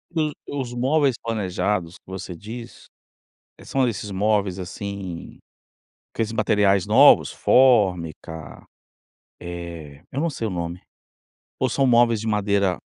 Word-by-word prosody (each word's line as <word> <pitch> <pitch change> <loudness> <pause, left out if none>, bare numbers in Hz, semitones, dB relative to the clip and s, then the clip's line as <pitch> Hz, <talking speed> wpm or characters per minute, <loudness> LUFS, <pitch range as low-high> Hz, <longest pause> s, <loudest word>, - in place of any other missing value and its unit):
O 155 -2 +1 0.3
os 120 -2 -6
móveis 135 +2 +2
planejados 100 -4 -2
que - - -43
você 95 -1 -6
diz, 115 +6 -9 0.7
eh, - - -15
são 135 -1 +1
desses 105 -3 -3
móveis 100 -1 0
assim, 95 -1 -7 0.7
aqueles 115 -1 -2
materiais 105 -3 +2
novos? 110 - +6
Fórmica, 90 - +1 0.8
eh, 85 -5 -8
eu 135 - -2
não 170 - +1
sei 115 -6 -4
o - - -2
nome. 85 0 -4 0.8
Ou 130 - +2
são 135 +2 +2
móveis 120 -2 +4
de 115 - -4
madeira 100 -3 +1
105 Hz, 125 wpm, -23 LUFS, 90-120 Hz, 0.8 s, novos